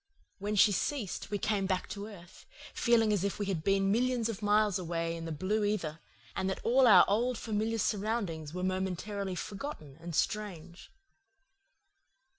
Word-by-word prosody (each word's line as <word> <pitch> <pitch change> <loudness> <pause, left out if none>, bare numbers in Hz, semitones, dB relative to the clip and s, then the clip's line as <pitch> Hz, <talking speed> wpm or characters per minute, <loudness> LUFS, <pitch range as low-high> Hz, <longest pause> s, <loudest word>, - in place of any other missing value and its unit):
When 205 +2 -2
she 205 +1 +6
ceased, 210 0 -2
we 205 - -1
came 200 -1 0
back 185 -1 -1
to 205 0 -6
earth, 185 -5 -13 0.3
feeling 225 -3 +3
as 200 -3 0
if 200 - -1
we 205 - -2
had 185 -5 -2
been 195 +1 +2
millions 240 0 +1
of 220 -2 -5
miles 210 -1 +3
away 165 -1 -2
in 165 0 -6
the 165 - -4
blue 190 +8 0
ether, 175 -7 -1 0.4
and 190 - -1
that 190 - -3
all 255 +2 +5
our 190 -5 +8
old 235 +4 +1
familiar 220 +1 -1
surroundings 200 -8 -1
were 180 +2 -4
momentarily 190 +1 -2
forgotten 185 - -6
and 170 -1 -6
strange. 180 -5 -3
200 Hz, 165 wpm, -31 LUFS, 180-215 Hz, 0.4 s, our